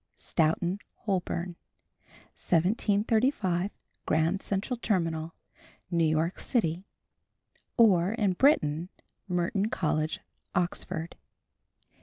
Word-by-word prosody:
STOUGHTON 170 +4 +1 0.3
HOLBORN. 180 -3 -1 0.8
1735 200 - +1 0.4
Grand 165 +5 +2
Central 205 +6 -2
Terminal, 165 -7 -1 0.6
New 170 -1 +2
York 160 +3 +1
City. 185 - 0 0.9
(or, 195 -5 +5
in 210 -5 +1
Britain, 175 - +3 0.4
Merton 180 +3 0
College, 155 -4 0 0.4
Oxford). 170 -2 -2
180 Hz, 75 wpm, -29 LUFS, 165-205 Hz, 0.9 s, or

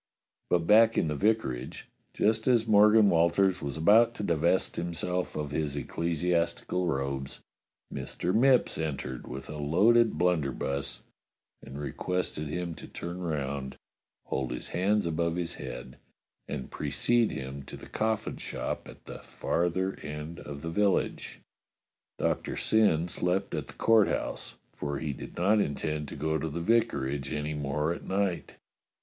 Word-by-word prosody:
But 85 -2 +2
back 110 +4 +6
in 80 - +2
the 75 - -1
vicarage, 70 - -1 0.3
just 110 +2 +1
as 120 -3 +4
Morgan 105 -1 +6
Walters 85 +3 +3
was 70 0 -4
about 115 +8 +5
to - - -5
divest 85 +1 +1
himself 90 +1 -2
of 75 -2 -3
his 75 -2 -1
ecclesiastical 85 +4 -1
robes, 70 -3 -3 0.5
Mr. 90 - -2
Mipps 125 - +4
entered 65 -5 -4
with 65 0 -7
a 75 - -6
loaded 110 +10 +4
blunderbuss 70 -5 0 0.6
and 70 +2 -9
re 75 - -4
quested 90 -4 -2
him 85 +2 -3
to - - -9
turn 85 +1 -6
round, 70 -5 -3 0.5
hold 65 -2 -2
his - - -4
hands 100 +3 +1
above 85 0 0
his 85 -1 -2
head, 65 - -8 0.5
and 70 -3 -5
precede 110 +11 +1
him 65 +1 -5
to - - -8
the - - -11
coffin 110 -1 -1
shop - - -4
at - - -14
the - - -8
farther 95 +3 -1
end 75 +2 -6
of 70 0 -8
the 80 - -3
village. 100 +2 0 0.8
Doctor - - -1
Syn 95 -7 +3
slept 90 +2 -1
at - - -3
the - - -11
Court 115 -2 +5
House, - - -3 0.2
for 70 -1 -3
he 75 -3 -3
did - - -9
not 100 +5 +3
intend 75 -3 -1
to - - -8
go 80 +2 -1
to 80 - -2
the 80 +3 -4
vicarage 70 - +1
any 75 +1 -2
more 75 +2 -1
at - - -8
night. 95 -2 -1
85 Hz, 150 wpm, -29 LUFS, 75-100 Hz, 0.8 s, back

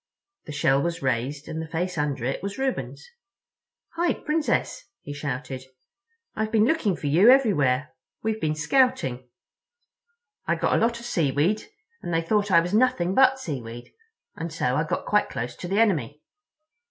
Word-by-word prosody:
The - - -7
shell 140 -2 +2
was 170 -1 -3
raised, 130 +3 -2
and 160 - -4
the 160 - -6
face 175 +4 -3
under 145 -5 -2
it 135 - -2
was 200 0 -5
Reuben's. 265 - -3 0.8
"Hi, 340 0 0
Princess!" 300 -5 -1 0.2
he 145 - -6
shouted. 130 -2 -5 0.7
"I've 220 0 -2
been 220 -1 +4
looking 240 - +1
for - - -8
you 170 +11 +5
everywhere. 155 - +3 0.3
We've 220 0 -2
been 155 -1 0
scouting. 155 - +1 1.2
I - - +2
got - - 0
a - - +2
lot 235 0 +1
of 235 - -10
seaweed, 165 - +1 0.4
and - - -5
they 165 0 +1
thought 205 +4 +1
I 170 -3 +6
was 175 +3 -4
nothing 215 -6 +2
but 265 +3 +5
seaweed; 120 - -7 0.4
and 165 0 -5
so 130 -5 -1
I 155 - +1
got - - -3
quite 210 0 +2
close 120 +1 -5
to 175 - -6
the 195 +4 0
enemy." 150 - +1
165 Hz, 165 wpm, -25 LUFS, 140-220 Hz, 1.2 s, I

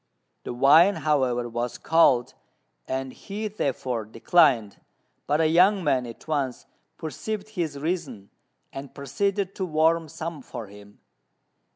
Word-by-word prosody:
The - - -4
wine, 160 +10 +6
however, 130 -5 0
was 120 +1 -4
cold, 135 -7 +3 0.5
and 130 0 -3
he 210 +2 -5
therefore 130 - -2
declined; 115 - +2 0.5
but 145 - +2
the 160 - +2
young 185 +4 +4
man 130 -6 +1
at 115 - -12
once 140 -5 -2 0.3
perceived 205 +7 -5
his 170 -8 -3
reason, 140 - -4 0.4
and 135 0 -8
proceeded 195 +7 -2
to 190 - -4
warm 160 -1 +1
some 160 0 -6
for 115 - -8
him. 100 0 -15
145 Hz, 130 wpm, -25 LUFS, 125-175 Hz, 0.5 s, wine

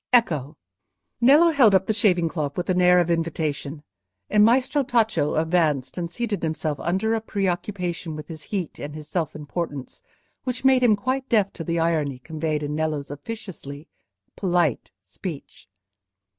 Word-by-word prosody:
Ecco!" 160 - +2 0.6
Nello 290 +8 +7
held 245 -10 +5
up 190 0 +3
the 220 - 0
shaving 185 -6 +2
cloth 150 -3 -3
with 180 +1 -1
an 180 0 +2
air 180 0 +6
of 175 -1 +2
invitation, 155 -3 -2 0.5
and 210 0 +5
Maestro 255 +5 +3
Tacco 225 - +1
advanced 160 -5 +1
and 170 -2 -3
seated 210 0 -3
himself 155 -2 -2
under 190 +6 0
a 225 - 0
preoccupation 180 -5 -2
with 150 -1 -8
his 160 -2 -8
heat 190 -6 -4
and 145 +1 -6
his 155 -1 -8
self 165 -4 -2
importance, 150 -2 -5 0.4
which 255 0 -4
made 265 -1 +5
him 235 -4 +5
quite 260 +5 -2
deaf 210 -5 +2
to 165 - -6
the 170 +1 -1
irony 160 -5 0
conveyed 155 +2 -3
in 145 0 -3
Nello's 150 -2 -2
officiously 150 -4 -8 0.5
polite 175 - 0
speech. 135 - -8
170 Hz, 155 wpm, -24 LUFS, 155-215 Hz, 0.6 s, Nello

